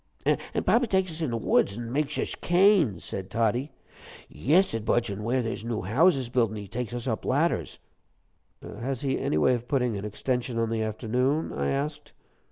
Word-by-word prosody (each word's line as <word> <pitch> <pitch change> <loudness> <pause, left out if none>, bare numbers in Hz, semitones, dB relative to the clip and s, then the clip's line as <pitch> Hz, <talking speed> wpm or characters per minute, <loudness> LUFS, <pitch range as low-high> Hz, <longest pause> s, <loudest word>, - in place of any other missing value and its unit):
"An' - - 0
papa 245 +1 +3
takes 190 -3 +1
us 160 +1 -5
in 160 - 0
the 115 - -1
woods, 100 -2 +2
an' 120 -1 -5
makesh 145 +2 -1
us - - -2
canes," 175 - +3
said 95 -1 -5
Toddie. 120 +5 0 0.6
"Yes," 175 - +2
said 115 -1 -3
Budge, 115 -1 +1
"and 100 +2 -5
where 125 +3 +1
there's 115 -1 -4
new 115 -4 -3
houses 135 - +3
buildin', 115 -3 0
he 100 -1 -7
takes 120 +3 -4
us 120 0 -4
up 110 -3 -2
ladders." 145 +6 0 0.9
"Has 130 +1 -4
he 135 -1 0
any 75 - 0
way 125 +11 +4
of 120 0 -3
putting 125 -5 +1
an 100 - -5
extension 120 +3 -2
on 115 -1 0
the 115 -1 0
afternoon?" 125 +7 -1
I 70 0 -1
asked. 145 +2 -3
120 Hz, 190 wpm, -27 LUFS, 110-145 Hz, 0.9 s, way